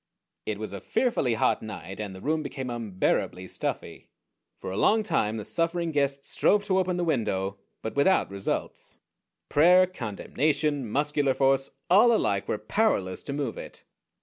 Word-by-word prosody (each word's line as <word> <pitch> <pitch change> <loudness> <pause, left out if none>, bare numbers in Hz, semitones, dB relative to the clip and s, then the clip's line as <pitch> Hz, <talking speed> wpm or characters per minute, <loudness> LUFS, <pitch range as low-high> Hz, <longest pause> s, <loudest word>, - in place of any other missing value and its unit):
It 105 - -2
was 110 -1 -5
a 100 - -6
fearfully 185 - 0
hot - - +1
night, 95 -3 -8
and 100 -3 -5
the 95 - -10
room 155 +5 0
became 135 -4 -5
unbearably 95 -4 -1
stuffy. - - -4 0.5
For - - -6
a - - -4
long 220 - +3
time 110 - 0
the 105 - -5
suffering 170 +2 0
guest 140 -2 0
strove 205 0 +2
to 190 -2 +1
open 180 -1 0
the 175 - 0
window, 100 - -1 0.2
but 110 - -4
without 140 - +3
results. 100 0 -4 0.5
Prayer, 180 +5 +6
condemnation, 145 - -1
muscular 145 +1 +1
force, 135 0 +2 0.2
all 210 +7 +6
alike 100 - +1
were - - -1
powerless 105 - 0
to 140 - -4
move 140 -5 -3
it. - - -10
135 Hz, 160 wpm, -27 LUFS, 105-165 Hz, 0.5 s, Prayer